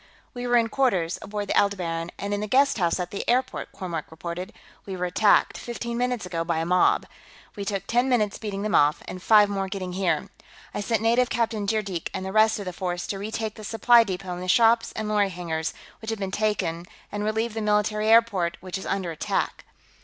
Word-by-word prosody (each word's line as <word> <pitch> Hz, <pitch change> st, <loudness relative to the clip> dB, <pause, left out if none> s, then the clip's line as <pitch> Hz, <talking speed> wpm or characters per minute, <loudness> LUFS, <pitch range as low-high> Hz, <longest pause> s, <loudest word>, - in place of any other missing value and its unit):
"We 245 Hz, -1 st, -4 dB
were 245 Hz, 0 st, +4 dB
in 230 Hz, -1 st, +2 dB
quarters, 190 Hz, -12 st, +1 dB
aboard 205 Hz, 0 st, -4 dB
the -, -, -1 dB
Aldebaran 175 Hz, -4 st, 0 dB
and 200 Hz, +1 st, -3 dB
in 205 Hz, -, -1 dB
the 210 Hz, -, -3 dB
guesthouse 230 Hz, -9 st, +2 dB
at 180 Hz, -1 st, -3 dB
the 200 Hz, -, -3 dB
airport," 255 Hz, +1 st, 0 dB
Kormork 170 Hz, -5 st, -5 dB
reported. 170 Hz, +4 st, -6 dB, 0.3 s
"We 190 Hz, -2 st, -6 dB
were 180 Hz, -, -1 dB
attacked, 200 Hz, +4 st, +3 dB
fifteen 235 Hz, 0 st, -5 dB
minutes 245 Hz, -3 st, -1 dB
ago, 165 Hz, -2 st, -2 dB
by 165 Hz, -1 st, -1 dB
a 165 Hz, -, -1 dB
mob. 180 Hz, +1 st, +3 dB, 0.5 s
We 200 Hz, -, -5 dB
took 195 Hz, -1 st, -2 dB
ten 245 Hz, +4 st, +1 dB
minutes 215 Hz, -5 st, +1 dB
beating 205 Hz, -2 st, -4 dB
them 215 Hz, -, -2 dB
off, 145 Hz, +2 st, +3 dB
and 185 Hz, -, -7 dB
five 210 Hz, +1 st, +6 dB
more 195 Hz, -1 st, -2 dB
getting 185 Hz, -2 st, -4 dB
here. 185 Hz, -1 st, 0 dB, 0.4 s
I -, -, -2 dB
sent 220 Hz, +1 st, 0 dB
Native 235 Hz, +2 st, +3 dB
Captain 225 Hz, -3 st, -1 dB
Zeerjeek 200 Hz, -5 st, -1 dB
and 190 Hz, -, -4 dB
the 190 Hz, -, -4 dB
rest 220 Hz, +2 st, +4 dB
of 205 Hz, -, -6 dB
the 180 Hz, -, -4 dB
force 175 Hz, 0 st, -3 dB
to 195 Hz, -, -4 dB
retake 220 Hz, +1 st, -3 dB
the 215 Hz, -, -11 dB
supply 230 Hz, +3 st, +5 dB
depot 190 Hz, -3 st, -4 dB
and 175 Hz, -, -6 dB
the 185 Hz, -, -5 dB
shops 230 Hz, +3 st, +4 dB
and 215 Hz, -1 st, -4 dB
lorry 210 Hz, -2 st, +2 dB
hangars, 165 Hz, -3 st, -3 dB, 0.3 s
which 220 Hz, -, -6 dB
had 225 Hz, -, -2 dB
been 195 Hz, -2 st, -4 dB
taken, 185 Hz, -5 st, -1 dB, 0.2 s
and 205 Hz, 0 st, -3 dB
relieve 220 Hz, +1 st, -1 dB
the 220 Hz, -, -3 dB
military 210 Hz, 0 st, +1 dB
airport, 220 Hz, -7 st, +4 dB
which 185 Hz, +1 st, -5 dB
is -, -, -7 dB
under 190 Hz, -3 st, -1 dB
attack." 160 Hz, -, -2 dB
205 Hz, 215 wpm, -25 LUFS, 180-220 Hz, 0.5 s, five